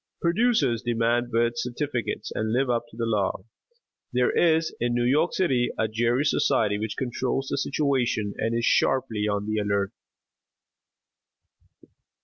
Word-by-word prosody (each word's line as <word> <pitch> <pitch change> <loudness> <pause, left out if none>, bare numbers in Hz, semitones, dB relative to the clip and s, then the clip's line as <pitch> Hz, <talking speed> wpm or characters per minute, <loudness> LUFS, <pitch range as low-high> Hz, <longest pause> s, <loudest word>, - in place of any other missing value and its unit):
Producers 170 - +2
demand 120 0 0
birth 115 0 +1
certificates 125 -3 -3
and 110 0 -2
live 125 +2 +1
up 120 0 -1
to 110 - -16
the 115 - -1
law. 100 -4 -1 0.7
There 125 -1 +2
is 160 -1 +2
in 120 0 0
New 120 0 +1
York 150 - +2
City 135 - +1
a 110 - +1
Gerry 120 +5 +1
Society, 105 -7 +2
which 110 0 -4
controls 130 +1 -2
the - - 0
situation 130 -8 0
and 115 +1 0
is 120 - 0
sharply 115 -7 +1
on 105 -1 -1
the 110 0 -1
alert. 100 -1 0
120 Hz, 140 wpm, -25 LUFS, 110-135 Hz, 0.7 s, Producers